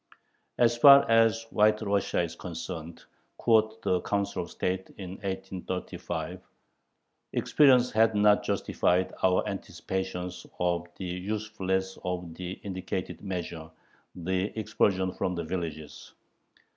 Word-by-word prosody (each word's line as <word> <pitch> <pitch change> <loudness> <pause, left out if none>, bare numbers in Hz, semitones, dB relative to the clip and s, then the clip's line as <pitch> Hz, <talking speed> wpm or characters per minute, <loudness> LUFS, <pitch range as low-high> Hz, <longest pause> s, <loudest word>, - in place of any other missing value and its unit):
As 120 -1 +4
far 140 +3 +8
as 115 0 +4
White 105 +1 +3
Russia 100 -3 +1
is 85 - -4
concerned 85 -1 -7 0.3
quoth 110 -1 +2
the 90 -1 +1
Council 100 -1 -1
of 85 - -7
State 95 +1 -2
in 95 -3 -7
1835 95 -3 -5 0.9
experience 130 -4 +4
has 110 +1 +4
not 105 0 +5
justified 90 +1 0
our 95 +2 +3
anticipations 90 -1 -4
of 85 -1 0
the 95 - -5
usefulness 95 0 -2
of 90 -2 -4
the 90 +2 -5
indicated 95 -1 -4
measure 85 -4 -5 0.5
[the 95 +2 -1
expulsion 95 -3 +1
from 90 - -2
the 85 - -3
villages]. 80 -3 -6
95 Hz, 115 wpm, -28 LUFS, 90-105 Hz, 0.9 s, far